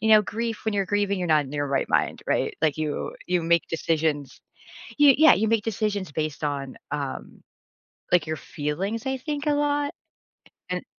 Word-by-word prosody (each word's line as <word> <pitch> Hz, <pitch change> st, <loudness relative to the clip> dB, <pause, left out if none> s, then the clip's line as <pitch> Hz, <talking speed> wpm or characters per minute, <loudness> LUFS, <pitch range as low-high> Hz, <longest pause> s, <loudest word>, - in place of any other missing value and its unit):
you 220 Hz, -, 0 dB
know, 215 Hz, -1 st, +7 dB
grief 225 Hz, +2 st, -4 dB
when 220 Hz, -, 0 dB
you're 195 Hz, -1 st, 0 dB
grieving, 200 Hz, 0 st, 0 dB
you're 175 Hz, -2 st, -2 dB
not 150 Hz, -2 st, +4 dB
in 135 Hz, -, -10 dB
your 145 Hz, -1 st, -1 dB
right 135 Hz, -1 st, 0 dB
mind, -, -, +1 dB
right? -, -, 0 dB
Like, 155 Hz, -1 st, +2 dB
you 150 Hz, -2 st, -3 dB
you 180 Hz, -1 st, +1 dB
make 170 Hz, +1 st, +2 dB
decisions. 160 Hz, -3 st, -1 dB, 0.6 s
You 290 Hz, -3 st, +7 dB
yeah. 315 Hz, 0 st, +8 dB
You 220 Hz, +1 st, +1 dB
make 225 Hz, -2 st, +1 dB
decisions 205 Hz, -6 st, -2 dB
based 155 Hz, -1 st, -3 dB
on, 140 Hz, -2 st, -3 dB, 0.2 s
um, 140 Hz, -3 st, -5 dB, 0.7 s
like, 170 Hz, -3 st, +4 dB
your 155 Hz, -, -2 dB
feelings, 190 Hz, -, -3 dB
I 265 Hz, 0 st, -1 dB
think, 290 Hz, +1 st, -4 dB
a 295 Hz, -, +3 dB
lot? 290 Hz, 0 st, 0 dB, 0.8 s
And -, -, -3 dB
180 Hz, 185 wpm, -25 LUFS, 150-225 Hz, 0.8 s, yeah